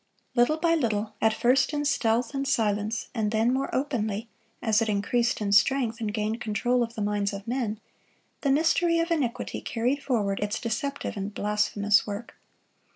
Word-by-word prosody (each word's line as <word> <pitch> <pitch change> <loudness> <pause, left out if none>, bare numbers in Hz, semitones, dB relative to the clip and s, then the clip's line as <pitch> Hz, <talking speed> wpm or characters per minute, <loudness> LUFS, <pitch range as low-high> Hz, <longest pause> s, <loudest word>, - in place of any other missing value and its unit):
Little 245 +6 +3
by 330 +1 +2
little, 220 -8 0
at 220 - +4
first 250 +6 +2
in 295 0 -1
stealth 235 -4 +1
and 275 0 -2
silence, 215 -1 0
and 220 -3 0
then 225 +3 +2
more 270 +1 -1
openly 230 -5 -2 0.3
as 220 -2 +2
it 225 - 0
increased 230 +4 +1
in 200 -1 -1
strength 230 +2 +3
and 215 -2 -1
gained 215 +2 -2
control 240 +3 +1
of 230 0 -2
the 215 - -2
minds 205 -1 0
of 200 +2 -7
men, 230 -4 -2 0.6
the 280 - 0
mystery 335 +4 +3
of 335 +1 0
iniquity 275 -8 -1
carried 250 +5 -1
forward 215 -8 0
its 205 +1 -2
deceptive 275 +5 -3
and 200 +1 -4
blasphemous 210 0 +2
work. 205 +3 -6
230 Hz, 170 wpm, -27 LUFS, 210-265 Hz, 0.6 s, at